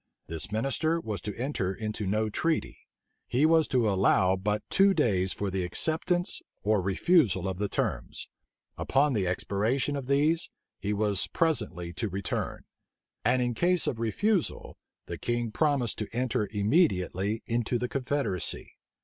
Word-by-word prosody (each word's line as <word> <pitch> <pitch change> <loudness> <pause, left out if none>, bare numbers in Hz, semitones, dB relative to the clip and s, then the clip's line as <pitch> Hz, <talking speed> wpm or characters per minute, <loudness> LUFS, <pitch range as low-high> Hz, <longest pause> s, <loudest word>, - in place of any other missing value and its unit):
This 80 +3 -4
minister 135 +9 0
was 110 -9 -4
to 105 - -6
enter 115 -7 -2
into 105 -1 -4
no 110 +3 +1
treaty: 160 +9 -2 0.4
he 135 +5 +2
was 160 -1 +4
to 125 -4 +2
allow 95 -1 +3
but 105 +3 -1
two 195 0 +5
days 95 - +2
for 100 -1 -3
the 95 -1 -1
acceptance 165 - 0 0.2
or 105 -1 +2
refusal 95 - +2
of 95 -1 -3
the 105 -1 -1
terms: - - -2 0.5
upon 140 +1 +2
the 100 -5 0
expiration 110 +10 0
of 135 -3 -5
these, 150 +5 +2 0.3
he 105 - -2
was 105 -2 +1
presently 110 - 0
to 110 +4 -2
return: 95 0 -3 0.6
and 125 0 +3
in 120 0 0
case 175 +7 +2
of 115 - -2
refusal, 180 - 0 0.3
the - - -6
king 120 -1 -1
promised 140 -4 +1
to 105 - -3
enter 120 -3 -1
immediately 105 - +1
into 120 +1 0
the 125 - -2
confederacy. 130 - -2
115 Hz, 150 wpm, -28 LUFS, 100-145 Hz, 0.6 s, two